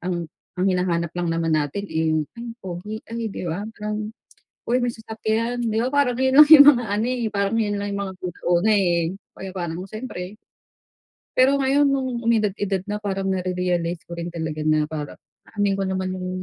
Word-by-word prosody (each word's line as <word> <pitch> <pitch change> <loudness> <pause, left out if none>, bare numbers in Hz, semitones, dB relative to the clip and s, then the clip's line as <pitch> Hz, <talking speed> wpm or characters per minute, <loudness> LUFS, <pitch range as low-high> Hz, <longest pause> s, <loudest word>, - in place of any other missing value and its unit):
ang 175 -1 -2 0.3
ang 180 - 0
hinahanap 175 -3 0
lang 175 -1 -2
naman 165 0 0
natin 155 +6 -1
eh 160 -3 0
yung 155 - 0
ay 235 0 -7 0.2
pogi 185 +4 -5
ay 230 -1 -4
di 185 - -6
ba 175 +5 -3
parang, 210 0 -4 0.6
uy 245 +2 +2
may 245 - +1
sasakyan 225 +1 -2
di 220 -1 0
ba 235 - +1
parang 270 -4 +2
'yon 260 0 +2
lang 295 - +5
yung 290 -3 +11
mga 245 -1 -2
ano 210 +3 0
eh 250 -1 -1
parang 200 +1 0
yun 205 -2 0
lang 200 0 -3
yung 200 - -2
mga 190 - -8
good 180 -1 -5
nung - - -2
una 220 - +3
eh. 190 -4 +3 0.4
Pro - - -11 0.3
nung 180 +3 -5
siyempre. 215 -4 -6 1.0
Pero 275 +2 +4
ngayon 275 +2 +3
nung 260 -3 -2
umidad-edad 205 -4 +1
na 210 - -2
parang 195 -2 -3
nare-realize 180 -2 -1
ko 170 - -7
rin 170 0 -5
talaga 160 -2 -4
na 155 -1 +2
parang 150 -2 -6 0.3
aanhin 205 -2 +1
ko 195 - -1
naman 190 0 -2
yung 185 0 -5
200 Hz, 195 wpm, -23 LUFS, 175-230 Hz, 1.0 s, yung